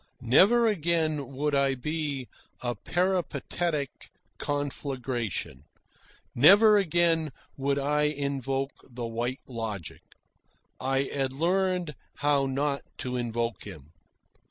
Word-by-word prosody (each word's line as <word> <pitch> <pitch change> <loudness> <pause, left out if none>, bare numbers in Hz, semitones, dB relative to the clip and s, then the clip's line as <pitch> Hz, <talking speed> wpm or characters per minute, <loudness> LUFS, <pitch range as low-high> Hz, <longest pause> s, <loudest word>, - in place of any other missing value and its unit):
Never 200 - +5
again 160 - 0
would 150 +2 0
I 140 -1 +3
be 145 -1 -3 0.3
a 120 -1 -1
peripatetic 170 - -1 0.5
conflagration. 130 - -3 0.7
Never 205 - +7
again 170 -5 +2 0.2
would 140 +1 0
I 150 +2 +1
invoke 135 -2 -1 0.2
the 120 0 -5
White 120 +3 -3
Logic. 110 -8 -5 0.8
I 135 +1 +1
had 135 -1 -2
learned 180 +1 +1 0.2
how 145 -2 +2
not 140 +1 -1 0.2
to 125 -2 -4
invoke 120 -1 -2
him. 80 -7 -11
140 Hz, 100 wpm, -28 LUFS, 125-160 Hz, 0.8 s, Never